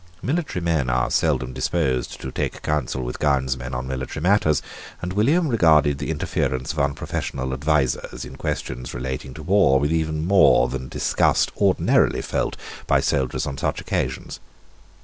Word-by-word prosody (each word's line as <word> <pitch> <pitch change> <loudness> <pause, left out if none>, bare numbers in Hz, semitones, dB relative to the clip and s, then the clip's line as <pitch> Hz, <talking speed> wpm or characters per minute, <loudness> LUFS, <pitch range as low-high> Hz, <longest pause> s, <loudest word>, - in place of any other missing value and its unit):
Military 145 - -1
men 80 -7 +1
are 60 0 +1
seldom 65 0 +1
disposed 65 -1 -1
to 65 - -6
take - - -3
counsel 70 -3 -1
with 60 +1 -5
gownsmen 65 -3 0
on 60 +1 -3
military 65 +1 -4
matters; 85 -3 +3 0.4
and 90 +1 -4
William 145 - +3
regarded 80 - +4
the 75 - -4
interference 65 -4 -1
of 75 - -4
unprofessional 70 -2 -2
advisers, 70 -1 0
in - - -10
questions 60 -1 -4
relating 65 +1 -4
to 80 - -8
war, 90 -6 +4
with 75 +3 0
even 80 -1 -1
more 95 -9 +5
than 65 +1 -4
the - - -10
disgust - - +1
ordinarily - - +2
felt - - -2 0.3
by - - +4
soldiers 65 +3 0
on 70 -2 -5
such - - -1
occasions. - - -3
70 Hz, 155 wpm, -23 LUFS, 65-80 Hz, 0.4 s, more